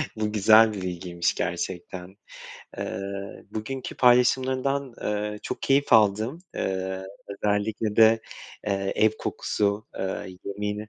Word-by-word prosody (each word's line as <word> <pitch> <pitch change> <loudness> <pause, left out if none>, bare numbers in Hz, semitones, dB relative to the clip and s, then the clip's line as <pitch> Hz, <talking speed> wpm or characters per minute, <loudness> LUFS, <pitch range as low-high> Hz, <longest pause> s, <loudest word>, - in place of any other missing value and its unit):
Bu 105 -1 -1
güzel 110 +1 +6
bir 95 - -5
bilgiymiş, 85 -1 -2
gerçekten. 90 +1 -4 0.6
Iıı, 100 0 -5
bugünkü 130 +5 -5
paylaşımlarından, 130 +1 +3
ııı, 105 0 -2
çok - - -5
keyif 140 0 +2
aldım, 110 +6 +4 0.2
ııı, 95 0 -2 0.2
özellikle 105 +1 -1
de, 110 0 +6 0.5
eee, 95 -1 -1
ev 110 0 +5
kokusu, 105 +1 -1
eee, 95 -1 -4
yemeğine. 105 +1 -4
105 Hz, 110 wpm, -26 LUFS, 95-110 Hz, 0.6 s, güzel